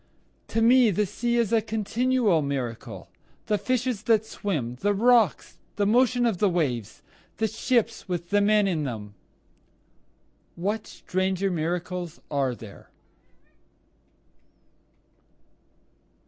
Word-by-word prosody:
To 225 - 0
me 245 0 +6
the 210 +2 +1
sea 235 +5 -1
is 235 -2 +1
a 225 - +4
continual 220 -2 +1
miracle, 130 -5 -4 0.4
The 210 -1 0
fishes 255 -3 -1
that 220 -1 +3
swim 145 - -3
the 205 0 +2
rocks 230 -2 +2 0.2
the 205 - +1
motion 245 +3 +3
of 220 -7 0
the 205 - +3
waves 145 - -2 0.3
the 220 - +1
ships 230 0 -1
with 175 0 -4
the 205 0 +4
men 210 0 +3
in 165 -5 -1
them, 110 -6 -6 1.4
What 205 +5 -2
stranger 190 +1 -1
miracles 175 +1 -3
are 135 -4 0
there? 110 -3 -13
200 Hz, 115 wpm, -26 LUFS, 165-225 Hz, 1.4 s, me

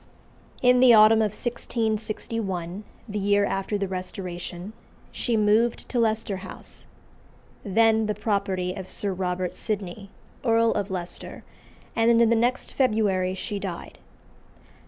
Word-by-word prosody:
In 250 0 +6
the 250 -2 +8
autumn 215 +1 +7
of 215 -1 +2
1661, 215 -4 -3 0.2
the 210 -1 -3
year 200 0 +3
after 195 +1 -2
the 200 -1 -2
Restoration, 185 0 -6 0.4
she 235 -3 -1
removed 215 +3 +2
to 245 - 0
Leicester 220 -3 0
House, 185 0 -8 0.8
then 220 +2 +3
the 210 - -1
property 195 -3 -1
of 190 -1 -7
Sir 200 0 0
Robert 180 -1 -2
Sydney, 200 -2 -4 0.3
Earl 230 -2 +3
of 205 -1 -2
Leicester, 180 -2 -5 0.5
and 230 0 +4
in 230 -1 +5
the - - +5
next 240 +3 0
February 205 -7 +1
she 205 +1 -4
died. 185 -4 -7
210 Hz, 130 wpm, -25 LUFS, 190-225 Hz, 0.8 s, the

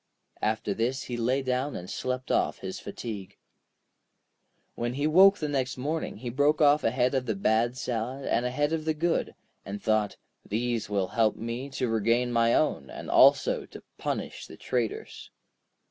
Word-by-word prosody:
After 105 -1 0
this 120 +5 -1
he 120 - -5
lay 125 +4 0
down 130 +2 -1
and 90 - -6
slept 130 +4 -3
off - - +1
his - - -6
fatigue. 105 -5 -7 1.4
When 120 +1 -3
he 145 +2 -1
woke 190 +6 +6
next 135 -4 -1
morning 150 +2 -3
he 120 +2 -5
broke 145 +4 +2
off 150 0 +5
a - - +3
head 125 +2 +1
of 130 -2 -1
the 110 - 0
bad 110 +5 +1
salad, 125 +2 -3
and 120 - +1
a 125 - 0
head 145 +5 0
of 155 -1 -2
the 160 -1 0
good, 165 +2 0 0.3
and 100 +1 -6
thought: 110 -1 0 0.3
'These 115 0 -2
will 100 -3 0
help 110 -1 +2
me 115 +4 -5
to 125 - 0
regain 115 +2 +1
my 115 0 +3
own, 70 - 0
and - - -7
also - - +5
to - - -12 0.2
punish - - -4
the - - -12
traitors.' 120 -4 -3
125 Hz, 175 wpm, -28 LUFS, 115-140 Hz, 1.4 s, woke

